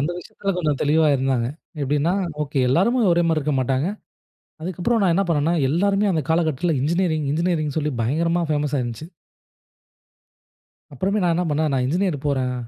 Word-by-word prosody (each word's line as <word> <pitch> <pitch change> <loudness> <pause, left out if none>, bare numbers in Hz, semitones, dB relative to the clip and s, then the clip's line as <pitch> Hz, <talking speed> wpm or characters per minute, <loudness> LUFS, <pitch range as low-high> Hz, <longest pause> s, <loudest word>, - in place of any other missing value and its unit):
அந்த 150 +5 0
விஷயத்தில 195 +3 -4
கொஞ்சம் 150 -5 0
தெளிவா 155 +1 +3
இருந்தாங்க. 130 -3 0 0.3
எப்படின்னா? 145 +5 +1 0.3
"ஓகே. 140 -2 -1
எல்லாருமே 205 - +2
ஒரே 170 0 +3
மாரி 165 -1 +2
இருக்க 150 0 -1
மாட்டாங்க." 130 +5 0 0.7
அதுக்கப்புறம் 185 +7 -1
நான் 180 -4 +3
என்ன 195 +3 +2
பண்ணேன்னா, 165 +1 +1
எல்லோருமே 195 +6 +1
அந்த 160 -3 0
காலகட்டத்தில 160 -1 +1
இன்ஜினியரிங், 160 -1 0
இன்ஜினியரிங்னு 160 -2 -1
சொல்லி 150 -1 -1
பயங்கரமா 165 +8 0
ஃபேமஸா 145 -1 0
இருந்துச்சு. 120 +6 -6 1.9
அப்புறமே 195 +9 -1
நான் 170 -1 +2
என்ன 180 +2 0
பண்னேன், 150 0 0
நான் 125 - +1
இன்ஜினியர் 170 -2 -1
போறேன். 130 -3 0
155 Hz, 150 wpm, -22 LUFS, 140-175 Hz, 1.9 s, தெளிவா